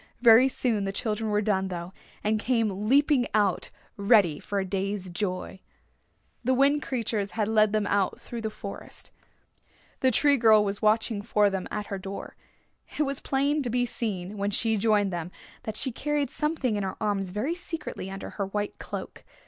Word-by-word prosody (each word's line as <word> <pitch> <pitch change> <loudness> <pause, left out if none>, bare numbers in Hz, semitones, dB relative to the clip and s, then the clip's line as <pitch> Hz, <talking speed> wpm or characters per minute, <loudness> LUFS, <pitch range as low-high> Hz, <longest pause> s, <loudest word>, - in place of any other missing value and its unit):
Very 235 +2 +8
soon 230 -6 0
the 195 - -1
children 215 +1 -2
were 210 0 +1
done, 190 -2 +1
though, 175 0 -6 0.3
and 215 +1 +1
came 215 -4 0
leaping 280 -2 +4
out 205 -4 +1 0.3
ready 200 -7 +4
for 205 - -4
a 190 - -1
day's 195 0 -3
joy. 185 0 -3 0.8
The 260 +2 +2
Wind 280 +3 +4
Creatures 225 -6 -2
led 215 -1 +3
them 215 -1 +1
then 205 - -1
out 200 -2 +1
through 235 -1 -7
the 220 - -2
forest. 200 -2 -9 0.9
The 260 - +4
Tree 285 +3 +4
Girl 220 -3 +6
was 200 0 -3
watching 215 0 +2
for 210 -1 +2
them 190 -1 -3
at 210 0 -3
her 195 - -3
door. 195 +1 -7 0.6
It 300 - +3
was 275 -2 -2
plain 280 +2 +1
to 250 - -2
be 245 +1 +1
seen, 205 -4 -4
when 200 0 0
she 220 +2 +1
joined 205 -2 +2
them, 170 0 -3 0.4
that 220 - -3
she 265 - 0
carried 295 +3 -1
something 300 -7 -1
in 205 - -1
her 190 -1 -3
arms 200 -3 -1
very 210 - -1
secretly 330 - -5
under 195 0 -7
her 200 -2 -3
white 205 +1 -3
cloak. - - -7
215 Hz, 180 wpm, -27 LUFS, 200-245 Hz, 0.9 s, Very